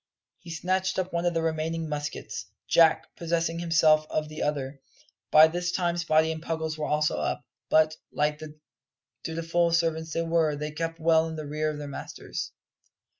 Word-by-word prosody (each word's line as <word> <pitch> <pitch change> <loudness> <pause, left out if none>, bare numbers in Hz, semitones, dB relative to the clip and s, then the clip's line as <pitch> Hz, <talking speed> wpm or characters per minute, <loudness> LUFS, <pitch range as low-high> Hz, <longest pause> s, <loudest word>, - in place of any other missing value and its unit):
He 175 - -13
snatched 185 +3 -1
up 185 -1 -2
one 170 +1 0
of 170 - 0
the 165 - +1
remaining 160 0 -1
muskets, 150 -1 -5 0.2
Jack 165 -2 +4
possessing 165 0 -1
himself 160 -2 +4
of 155 0 -2
the 155 - -7
other. 140 -2 -2 0.5
By 155 +1 +9
this 175 +2 -2
time 175 -2 0
Spottie 160 -2 +2
and 160 0 -5
Puggles 160 -1 -3
were 155 -1 -3
also 150 0 +1
up, 75 - -2 0.2
but, 155 0 +4
like 150 0 0
the 155 -1 -9 0.7
dutiful 165 +1 0
servants 165 -1 0
they 165 - 0
were, 165 -2 +2
they 150 +1 -4
kept 165 +2 -4
well 160 0 +4
in 160 - -5
the 155 -1 -5
rear 155 +1 -1
of 150 - -4
their 145 -1 -6
masters. 140 - -6
160 Hz, 175 wpm, -27 LUFS, 155-165 Hz, 0.7 s, By